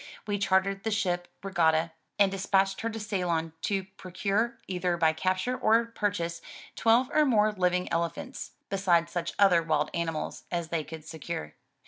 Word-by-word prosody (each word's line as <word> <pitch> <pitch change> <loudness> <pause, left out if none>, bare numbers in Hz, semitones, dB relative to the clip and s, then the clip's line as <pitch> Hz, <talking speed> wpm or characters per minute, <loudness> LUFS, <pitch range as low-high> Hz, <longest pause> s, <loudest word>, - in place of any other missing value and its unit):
We 205 -1 -1
chartered 195 0 +1
the 225 - 0
ship 175 -4 0 0.2
Regatta, 165 -4 +2 0.3
and 200 -1 +4
despatched 195 0 +1
her 230 - -1
to 225 0 -5
Ceylon 175 -6 -1
to 195 -2 0
procure, 200 +6 -1
either 180 -2 -1
by 160 -2 +3
capture 185 +8 0
or 230 0 +3
purchase, 200 -7 -2 0.3
twelve 240 +4 +3
or 305 - +5
more 215 -6 +3
living 180 -2 +1
elephants, 170 - -3 0.2
besides 175 -4 +2
such 170 -1 -3
other 190 -4 +5
wild 155 -2 0
animals 165 -2 -3
as 170 -2 -2
they 165 -2 -1
could 160 0 -9
secure. 160 - -6
185 Hz, 155 wpm, -28 LUFS, 170-205 Hz, 0.3 s, or